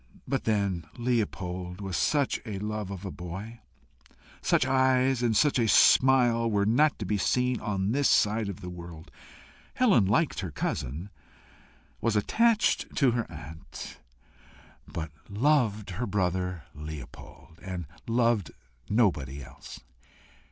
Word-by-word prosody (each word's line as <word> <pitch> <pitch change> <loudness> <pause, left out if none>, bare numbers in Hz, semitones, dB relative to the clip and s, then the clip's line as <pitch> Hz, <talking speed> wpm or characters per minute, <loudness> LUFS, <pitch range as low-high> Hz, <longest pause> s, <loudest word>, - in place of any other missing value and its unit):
But 135 - -1
then 100 -6 0
Leopold 95 -7 -2
was 95 -3 -4
such 145 - +1
a 105 -4 -5
love 105 0 -4
of 100 0 -7
a 95 - -4
boy! 95 +7 -7 0.8
Such 125 - +2
eyes 130 -1 +3
and 115 -3 +2
such 145 -4 +3
a 115 - +2
smile 120 +1 +5
were 100 -2 +1
not 140 +8 +3
to 105 - -5
be 105 +2 0
seen 125 +4 +1
on 100 -1 -1
this 140 +2 +2
side 105 +1 +3
the 90 -2 -6
world. 85 -2 -10 0.6
Helen 200 - +4
liked 135 - +1
her 95 - -3
cousin, 75 +5 -4 0.9
was 115 -2 +1
attached 220 - +2
to 135 -5 +4
her 115 -4 -2
aunt, 80 0 -9 0.9
but 80 -1 -5 0.2
loved 110 -3 +1
her 110 +7 -3
brother 90 -3 -1
Leopold, 75 +2 -10
and 90 -3 -5 0.2
loved 115 -5 +1 0.4
nobody 75 - +1
else. 65 +1 -12
105 Hz, 130 wpm, -28 LUFS, 90-120 Hz, 0.9 s, smile